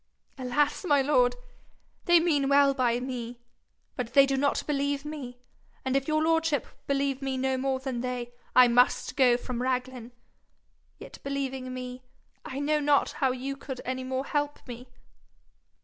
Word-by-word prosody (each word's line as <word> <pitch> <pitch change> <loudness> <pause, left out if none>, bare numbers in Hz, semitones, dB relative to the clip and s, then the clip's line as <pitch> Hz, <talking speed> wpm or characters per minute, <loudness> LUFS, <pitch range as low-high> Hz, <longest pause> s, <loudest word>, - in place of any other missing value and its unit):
'Alas, 280 +6 0
my 290 -6 +3
lord! 250 -3 +3 0.7
they 345 -1 +6
mean 295 -5 +1
well 280 0 +5
by 245 -3 +1
me, 245 -2 -5 0.6
but 245 -2 -4
they 275 -1 +7
do 275 0 0
not 280 +1 +1
believe 285 -1 -1
me; 280 -5 -7 0.5
and 260 0 0
if 275 0 0
your 310 0 +1
lordship 325 -4 +1 0.2
believe 275 -1 0
me 270 -1 -2
no 265 0 0
more 265 0 -1
than 260 -3 -4
they, 250 -1 -4 0.2
I 255 -1 +8
must 245 +1 +2
go 250 -2 +4
from 245 -1 -5
Raglan. 255 -1 -3 0.9
Yet - - -11
believing 270 -2 -4
me, 250 0 -6 0.4
I 265 - -7
know 300 +1 +1
not 290 -1 +2
how 265 -2 0
you 260 +2 -4
could 270 -2 -7
any 255 0 -3
more 260 +1 -3
help 290 -1 -2
me.' 245 +1 -9
265 Hz, 160 wpm, -28 LUFS, 250-285 Hz, 0.9 s, I